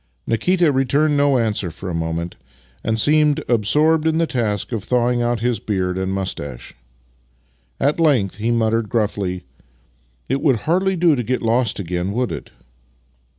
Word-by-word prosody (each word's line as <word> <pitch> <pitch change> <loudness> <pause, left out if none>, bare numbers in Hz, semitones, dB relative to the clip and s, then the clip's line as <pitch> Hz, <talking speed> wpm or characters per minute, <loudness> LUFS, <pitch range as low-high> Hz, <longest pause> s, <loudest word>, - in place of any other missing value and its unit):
Nikita 170 - +2
returned 140 +3 +2
no 140 -2 +3
answer 105 -6 0
for 85 +4 -9
a 90 - -3
moment, 80 +1 -3 0.5
and 110 0 0
seemed 150 +3 +3
absorbed 150 +8 +2
in 160 0 +1
the 165 - +2
task 110 -8 -2
of 110 -5 -3
thawing 120 +1 +1
out 120 -2 0
his 120 -3 0
beard 95 -4 -2
and 95 0 -2
moustache. 80 -10 -5 1.1
At 145 +4 +1
length 130 - +2
he 110 +2 -1
muttered 115 -2 +1
gruffly: 100 -5 -1 0.4
" - - -39
It 135 +2 -1
would 130 -9 +2
hardly 185 - +1
do 170 -3 +3
to 125 - -1
get 125 +2 -2
lost 115 0 +1
again, 90 +1 -3
would 125 +2 -1
it? - - -6
115 Hz, 160 wpm, -20 LUFS, 95-145 Hz, 1.1 s, no